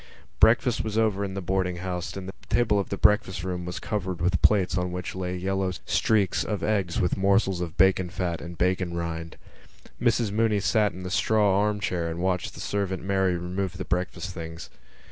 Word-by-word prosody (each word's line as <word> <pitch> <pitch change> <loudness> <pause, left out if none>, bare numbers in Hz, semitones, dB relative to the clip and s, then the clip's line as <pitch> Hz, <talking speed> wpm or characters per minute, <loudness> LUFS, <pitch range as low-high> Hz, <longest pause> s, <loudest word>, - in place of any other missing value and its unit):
Breakfast 120 - +4
was 110 -1 -3
over 105 -3 +2
in 95 -1 -4
the 95 - -4
boarding 95 0 0
house 90 0 -4
and 95 -1 -6
the 95 - -6 0.2
table 110 -4 +3
of 100 - -3
the 100 - -3
breakfast 105 -4 +3
room 90 -1 -3
was 90 - -5
covered 95 -4 -3
with 90 +1 +1
plates 100 -5 +3
on 90 0 -1
which 90 0 -4
lay 90 -1 -3
yellow 95 +1 -1
streaks 105 -4 +2
of 105 -3 -3
eggs 100 -5 0
with 90 - +1
morsels 95 -1 +2
of 85 -2 -5
bacon 95 -1 +4
fat 90 -2 -3
and 85 0 -8
bacon 90 -1 0
rind. 85 -1 -4 0.6
Mrs 115 -3 +2
Mooney 110 0 +2
sat 105 +1 +2
in 90 +2 -9
the 90 - -5
straw 105 -1 +3
arm 105 0 +1
chair 85 -4 -1
and 80 - -4
watched 90 0 -1
the - - -10
servant 100 -2 -2
Mary 95 -2 +1
remove 90 +2 -3
the 95 - -4
breakfast 90 +2 -2
things. 80 -1 -8
95 Hz, 200 wpm, -26 LUFS, 90-100 Hz, 0.6 s, Breakfast